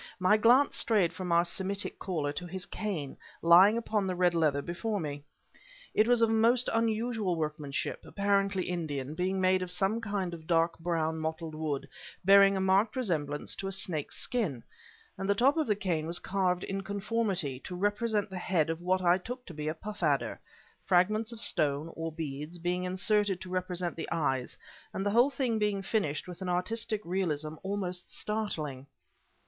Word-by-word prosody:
My 185 Hz, +3 st, +4 dB
glance 245 Hz, +6 st, +4 dB
strayed 200 Hz, -7 st, +2 dB
from 180 Hz, 0 st, -4 dB
our 170 Hz, +1 st, +4 dB
Semitic 195 Hz, +3 st, -3 dB
caller 155 Hz, -6 st, -2 dB
to 175 Hz, +4 st, -5 dB
his 185 Hz, +1 st, -4 dB
cane, 180 Hz, -10 st, -4 dB, 0.3 s
lying 185 Hz, +6 st, +7 dB
upon 215 Hz, -4 st, -1 dB
the 185 Hz, -, -1 dB
red 180 Hz, -1 st, +3 dB
leather 150 Hz, -4 st, +2 dB
before 205 Hz, +5 st, -2 dB
me. 145 Hz, -3 st, -5 dB, 0.7 s
It 215 Hz, -, +4 dB
was 240 Hz, -1 st, +4 dB
of 225 Hz, -, +4 dB
most 230 Hz, +3 st, +3 dB
unusual 225 Hz, -3 st, 0 dB
workmanship, 150 Hz, -3 st, -3 dB
apparently 200 Hz, -1 st, +1 dB
Indian, 150 Hz, -6 st, -3 dB
being 185 Hz, +3 st, -1 dB
made 185 Hz, 0 st, +3 dB
of 185 Hz, -, -3 dB
some 195 Hz, +5 st, 0 dB
kind 200 Hz, -5 st, -2 dB
of 160 Hz, -2 st, -9 dB
dark 165 Hz, -1 st, +2 dB
brown, 160 Hz, -1 st, -1 dB
mottled 160 Hz, 0 st, -4 dB
wood, 150 Hz, -3 st, -3 dB, 0.4 s
bearing 195 Hz, 0 st, +7 dB
a -, -, 0 dB
marked 190 Hz, +4 st, +3 dB
resemblance 155 Hz, -, -1 dB
to 195 Hz, -, -4 dB
a -, -, -3 dB
snake's 170 Hz, -6 st, -2 dB
skin; 180 Hz, -, -2 dB, 0.6 s
and 195 Hz, -, -3 dB
the 200 Hz, -, +4 dB
top 260 Hz, +7 st, +4 dB
of 315 Hz, -2 st, 0 dB
the 210 Hz, -, +2 dB
cane 175 Hz, -6 st, -1 dB
was 170 Hz, +1 st, -1 dB
carved 185 Hz, -2 st, 0 dB
in 195 Hz, 0 st, -3 dB
conformity, 195 Hz, -, -2 dB
to 180 Hz, -, -7 dB
represent 205 Hz, +2 st, 0 dB
the 185 Hz, -, -4 dB
head 165 Hz, -4 st, +1 dB
of 165 Hz, +1 st, -5 dB
what 185 Hz, +1 st, +1 dB
I 175 Hz, +1 st, +4 dB
took 250 Hz, +6 st, -7 dB
to 170 Hz, -, -9 dB
be 150 Hz, -1 st, -5 dB
a 155 Hz, -, -1 dB
puff 210 Hz, +4 st, -8 dB
adder, 145 Hz, -4 st, +1 dB, 0.4 s
fragments 215 Hz, +5 st, +2 dB
of 230 Hz, -, -8 dB
stone, 150 Hz, -5 st, +1 dB
or 165 Hz, 0 st, -4 dB
beads, 150 Hz, +1 st, -5 dB
being 180 Hz, +1 st, -1 dB
inserted 195 Hz, +1 st, +1 dB
to 185 Hz, -, -8 dB
represent 180 Hz, -1 st, -2 dB
the 165 Hz, -, -5 dB
eyes, 135 Hz, -6 st, -1 dB, 0.4 s
and 195 Hz, -, -2 dB
the 205 Hz, -, +2 dB
whole 240 Hz, +5 st, +5 dB
thing 255 Hz, -5 st, -1 dB
being 205 Hz, -2 st, 0 dB
finished 185 Hz, -8 st, -1 dB
with 180 Hz, +1 st, -9 dB
an 185 Hz, -, -3 dB
artistic 215 Hz, +4 st, -1 dB
realism 160 Hz, -4 st, -1 dB
almost 190 Hz, -2 st, -3 dB
startling. 155 Hz, -11 st, -3 dB
185 Hz, 180 wpm, -30 LUFS, 165-205 Hz, 0.7 s, lying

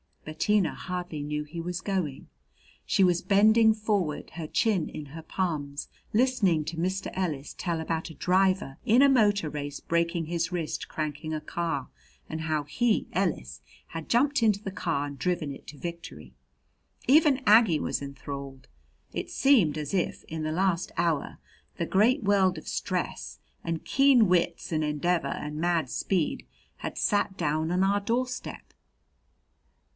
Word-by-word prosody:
Bettina 185 Hz, +5 st, +1 dB
hardly 175 Hz, -4 st, -5 dB
knew 150 Hz, +1 st, -3 dB
he 150 Hz, +3 st, -8 dB
was 175 Hz, +1 st, -4 dB
going. 185 Hz, -10 st, -3 dB, 0.6 s
She 195 Hz, -, +3 dB
was 175 Hz, -1 st, +3 dB
bending 220 Hz, +2 st, +5 dB
forward, 205 Hz, -8 st, -1 dB
her 165 Hz, -2 st, -6 dB
chin 195 Hz, -2 st, +1 dB
in 150 Hz, -, -7 dB
her 160 Hz, +4 st, -9 dB
palms, 150 Hz, -5 st, -3 dB, 0.2 s
listening 215 Hz, -9 st, +3 dB
to 165 Hz, +1 st, -5 dB
Mr. 185 Hz, +3 st, -2 dB
Ellis 155 Hz, -7 st, -3 dB
tell 170 Hz, -3 st, -2 dB
about 160 Hz, 0 st, -3 dB
a 160 Hz, -, -11 dB
driver 185 Hz, -6 st, +1 dB
in 235 Hz, +4 st, +5 dB
a 280 Hz, -, +6 dB
motor 205 Hz, -, +3 dB
race 145 Hz, -1 st, -5 dB
breaking 170 Hz, 0 st, 0 dB
his 165 Hz, +1 st, -2 dB
wrist 170 Hz, -4 st, -3 dB
cranking 155 Hz, 0 st, -4 dB
a 155 Hz, -, -3 dB
car, 165 Hz, -3 st, -3 dB, 0.4 s
and 160 Hz, 0 st, -4 dB
how 155 Hz, -2 st, -1 dB
he 220 Hz, -, 0 dB
Ellis 65 Hz, -, -1 dB, 0.3 s
had 165 Hz, -1 st, -7 dB
jumped 280 Hz, +3 st, +3 dB
into 210 Hz, -2 st, +2 dB
the 195 Hz, -, -4 dB
car 165 Hz, -6 st, -1 dB
and 140 Hz, -2 st, -9 dB
driven 175 Hz, -4 st, -1 dB
it -, -, -13 dB
to 150 Hz, -, -10 dB
victory. 165 Hz, -, -8 dB, 0.7 s
Even 285 Hz, 0 st, +5 dB
Aggie 215 Hz, -6 st, +6 dB
was -, -, -2 dB
enthralled. 140 Hz, -1 st, -7 dB, 0.5 s
It -, -, -4 dB
seemed 225 Hz, -, +3 dB
as 150 Hz, +1 st, -4 dB
if, 185 Hz, -3 st, -1 dB
in 160 Hz, 0 st, -6 dB
the 155 Hz, -, -1 dB
last 180 Hz, +1 st, 0 dB
hour, 165 Hz, -4 st, 0 dB, 0.4 s
the 170 Hz, -, -1 dB
great 230 Hz, -, +3 dB
world 195 Hz, -3 st, +3 dB
of 155 Hz, -, -9 dB
stress -, -, -3 dB, 0.2 s
and 165 Hz, -1 st, -3 dB
keen 270 Hz, -5 st, +5 dB
wits 175 Hz, -2 st, +1 dB
and 155 Hz, -1 st, +1 dB
endeavor 150 Hz, +1 st, 0 dB
and 150 Hz, +2 st, -4 dB
mad 165 Hz, -4 st, +1 dB
speed 180 Hz, +2 st, -1 dB, 0.3 s
had -, -, -6 dB
sat 205 Hz, -2 st, +1 dB
down 155 Hz, +2 st, 0 dB
on 180 Hz, +1 st, +2 dB
our 200 Hz, +1 st, +3 dB
door 235 Hz, +5 st, 0 dB
step. 250 Hz, 0 st, -8 dB
170 Hz, 160 wpm, -28 LUFS, 155-200 Hz, 0.7 s, a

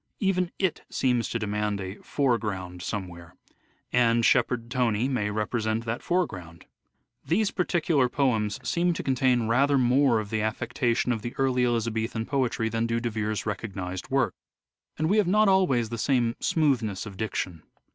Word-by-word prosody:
Even 185 Hz, -4 st, +1 dB
it 185 Hz, -4 st, 0 dB
seems 125 Hz, -3 st, 0 dB
to -, -, -1 dB
demand 105 Hz, -1 st, -2 dB
a 95 Hz, -1 st, -5 dB
" -, -, -19 dB, 0.2 s
foreground 105 Hz, -10 st, 0 dB
somewhere 90 Hz, -4 st, -6 dB, 0.3 s
"; -, -, -38 dB, 0.2 s
and 115 Hz, -1 st, +3 dB
Shepherd 120 Hz, -1 st, +2 dB
Tony 120 Hz, -2 st, +1 dB
may 125 Hz, -6 st, -1 dB
represent 110 Hz, +1 st, -1 dB
that 115 Hz, +1 st, -3 dB
foreground. 90 Hz, -, -2 dB, 0.6 s
These 200 Hz, +5 st, +1 dB
particular 165 Hz, -7 st, +1 dB
poems 110 Hz, -7 st, 0 dB
seem 175 Hz, +1 st, +1 dB
to -, -, -5 dB
contain 125 Hz, -3 st, +2 dB
rather 140 Hz, +5 st, +3 dB
more 130 Hz, -1 st, +3 dB
of 105 Hz, -2 st, -6 dB
the 110 Hz, -1 st, 0 dB
affectation 115 Hz, +3 st, 0 dB
of 115 Hz, -3 st, -1 dB
the 120 Hz, +2 st, -6 dB
early 130 Hz, -2 st, +1 dB
Elizabethan 115 Hz, -1 st, -1 dB
poetry 130 Hz, -4 st, 0 dB
than 115 Hz, +1 st, -1 dB
do 115 Hz, 0 st, 0 dB
De 120 Hz, 0 st, -2 dB
Vere's 110 Hz, -1 st, -2 dB
recognized 95 Hz, -4 st, -5 dB
work, 135 Hz, -1 st, +1 dB, 0.6 s
and 155 Hz, +5 st, +1 dB
have 210 Hz, -4 st, +3 dB
not 210 Hz, +3 st, +4 dB
always 160 Hz, -, +3 dB
the 115 Hz, 0 st, -5 dB
same 120 Hz, -3 st, +1 dB
smoothness 120 Hz, -, +1 dB
of 105 Hz, -2 st, -8 dB
diction. 95 Hz, -5 st, -3 dB
115 Hz, 160 wpm, -26 LUFS, 105-135 Hz, 0.6 s, not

